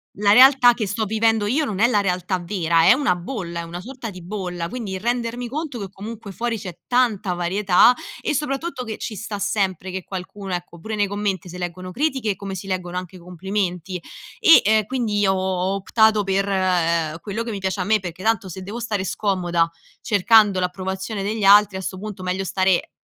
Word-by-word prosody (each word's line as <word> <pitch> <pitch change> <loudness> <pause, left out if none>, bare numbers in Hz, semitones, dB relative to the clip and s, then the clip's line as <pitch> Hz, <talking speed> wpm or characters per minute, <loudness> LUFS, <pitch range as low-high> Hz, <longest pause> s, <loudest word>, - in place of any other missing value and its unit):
La 205 0 +3
realtà 255 0 +7
che 220 -4 -3
sto 220 +3 -1
vivendo 220 0 +1
io 285 +8 +1
non 210 -9 -4
è 230 - +5
la 215 -4 +2
realtà 185 -1 -1
vera, 170 -3 +1
è - - +8
una 275 -9 +1
bolla, 175 -2 -5
è - - -4
una 170 +1 -7
sorta 245 +1 -7
di 185 -1 -10
bolla. 180 -3 -4
Quindi, 200 -5 -5
rendermi 240 +2 -2
conto 295 -1 -4
che 200 -3 -5
comunque 205 +2 -8
fuori 230 +1 -2
c'è 180 -3 -8
tanta 220 -7 +1
varietà, 190 +6 +4 0.3
e 300 - -1
soprattutto 275 0 -2
che 220 -3 -6
ci 220 - -5
sta 205 +1 -5
sempre 195 -3 -1
che 190 0 -4
qualcuno, 190 +1 -7
ecco, 175 -1 -5
pure 220 +5 -5
nei 205 -1 +2
commenti 195 -3 -3
se 180 +1 -8
leggono 180 +1 -5
critiche, 265 -5 0
come 195 0 -6
si 190 - -7
leggono 180 -2 -3
anche 180 0 -8
i - - -11
complimenti, 180 0 -3 0.4
e, 330 - +8
ehm, 215 0 +3
quindi 220 -5 0
ho 190 0 +1
ho 190 +2 0
optato 215 +1 +3
per, 195 +1 0
ehm, 170 -4 +1
quello 220 +3 -4
che 230 - -4
mi 200 - -4
piace 190 +1 -2
a 180 - 0
me, 215 0 +2
perché 180 +1 -7
tanto 220 -4 +1
se 185 +2 -8
devo 210 +5 -6
stare 210 -5 -2
scomoda, 175 -4 0 0.3
cercando 205 -1 +4
l'approvazione 190 +3 -3
degli 210 +1 -2
altri 205 0 +6
a - - -4
'sto 185 0 -5
punto 205 -3 -7
meglio 185 +1 -1
stare 185 0 +1
195 Hz, 205 wpm, -22 LUFS, 185-220 Hz, 0.4 s, è